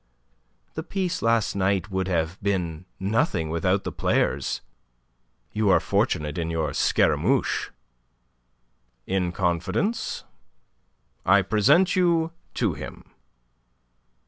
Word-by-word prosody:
The 160 - -4
piece 185 0 -2
last 115 -2 +2
night 100 +1 0
would 95 0 -1
have 85 0 -1
been 90 -4 -2
nothing 95 - 0
without 90 +4 +1
the - - -4
players. - - 0 0.9
You 105 -1 +1
are 95 - +6
fortunate 75 +2 0
in 85 -1 -2
your 80 -2 -1
Scaramouche." - - +1 1.4
"In 90 -2 0
confidence 90 - -1 1.0
I 100 +1 +5
present 110 - +3
you 170 -3 +2 0.2
to 110 -8 +1
him." 70 -3 -9
95 Hz, 100 wpm, -25 LUFS, 85-115 Hz, 1.4 s, are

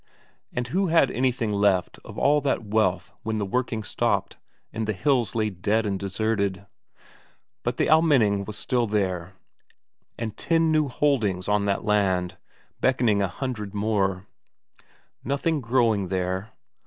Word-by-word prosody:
And 120 -1 -3
who 190 +7 +1
had 165 -5 +4
anything 120 -4 0
left 100 -3 +1
of - - -11
all 145 +1 +3
that 135 -5 -1
wealth 100 -4 0
when 110 0 -2
the 105 - -1
working 115 +1 -2
stopped, - - -1 0.4
and 110 -1 -3
the 110 - 0
hills 120 0 +1
lay 110 -2 0
dead 105 +5 0
and 100 -2 -1
deserted? 100 -1 -1 1.0
But - - -2
the - - +2
Almenning 130 -11 +4
was 105 - -7
there - - -7
still, 100 -7 -1 0.9
and 115 -2 -4
ten 165 -1 +2
new 155 -2 +2
holdings 115 -10 0
on 105 -1 +2
that 100 0 -1
land, 95 -4 +1 0.4
beckoning 120 -6 +2
a 100 - +2
hundred 105 -1 -5
more. 100 -3 0 1.0
Nothing 140 +3 0
growing 115 -5 +2
there? 95 +2 -2
110 Hz, 140 wpm, -25 LUFS, 100-125 Hz, 1.0 s, had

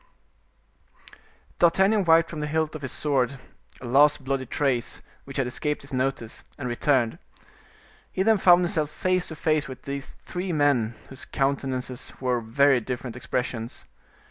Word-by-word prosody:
D'Artagnan 190 +4 +4
wiped 165 0 +5
from 155 - -5
the 150 - -2
hilt 155 +1 0
of 155 - -7
his 130 -4 -4
sword 135 -3 +1 0.4
a - - -7
last 145 +3 +4
bloody 130 -1 -2
trace, 130 -3 -1 0.3
which 135 0 -7
had 135 - +1
escaped 150 +4 -2
his 140 0 -11
notice, 130 -3 -2
and 130 - -4
returned. 120 -1 +1 0.9
He 190 - 0
then 220 0 +4
found 180 -1 +6
himself 160 -4 0
face 185 +3 0
to 160 - -6
face 155 -1 +1
with 130 -1 -9
these 140 0 -6
three 180 +1 -3
men, 135 -7 +2
whose 135 - -8
countenances 135 -2 -2
wore 125 -2 0
very 130 +4 +3
different 125 0 -5
expressions. 120 -1 -4
140 Hz, 150 wpm, -25 LUFS, 125-155 Hz, 0.9 s, found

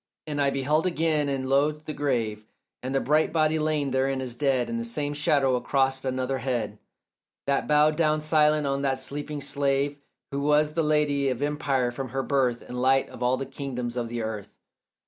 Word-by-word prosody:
And 145 -2 -2
I 140 - +3
beheld 150 +5 +1
again, 155 -4 +1
and 135 -1 -2
lo 140 +3 +3
the 155 0 -8
grave, 115 -7 -2 0.3
And 130 +2 -3
the - - +4
bright 150 +3 +2
body 155 -1 +2
laid 155 -3 0
therein 135 +1 +1
as 130 -2 -3
dead, 130 -2 +1
And 115 0 -3
the - - -3
same 145 +5 -2
shadow 140 -3 +2
across 135 +1 0
another 130 0 -1
head 115 -5 -2 0.7
That 140 0 0
bowed 150 +1 +4
down 155 -2 +2
silent 150 -1 +3
on 140 0 0
that 135 -1 0
sleeping 145 +2 -5
slave 140 0 0 0.3
Who 140 - -2
was 150 +1 +3
the 165 - +1
lady 150 -3 +2
of 130 +1 -2
empire 140 -4 0
from 130 +1 -5
her 135 +2 -2
birth 130 -4 0
And 125 0 -5
light 135 +1 +3
of - - -12
all 125 +1 +2
the 135 - -4
kingdoms 125 -3 -5
of 120 -2 -2
the 120 -1 -3
earth. 110 -2 -6
135 Hz, 195 wpm, -26 LUFS, 130-150 Hz, 0.7 s, the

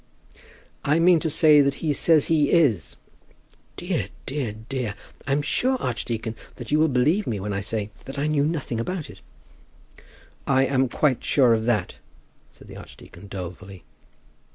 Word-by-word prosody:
"I 150 +2 +2
mean 170 0 +5
to 160 - -2
say 150 -1 +6
that 140 0 +1
he 155 0 -1
says 155 +1 +3
he 150 -3 +2
is." 130 - +2 0.8
"Dear, - - -2 0.2
dear, 135 -6 -3
dear! 125 -6 -3 0.3
I'm 140 +1 +1
sure, 260 - +1
archdeacon, 115 - -3 0.2
that 120 0 -9
you 150 - +3
will 160 - +4
believe 150 +10 +1
me 105 -4 -2
when 100 +1 -4
I 100 - -2
say 105 0 -2
that 135 +1 -8
I 140 - -1
knew 150 -2 +1
nothing 150 -7 -2
about 165 +6 -4
it." - - -16 1.3
"I 135 -1 +3
am 130 -1 +1
quite 135 -2 0
sure 125 -5 +4
of 110 0 0
that," 110 -6 -1 0.5
said - - -17
the - - -11
archdeacon 100 - -13
dolefully. 90 -1 -8
135 Hz, 160 wpm, -24 LUFS, 110-150 Hz, 1.3 s, say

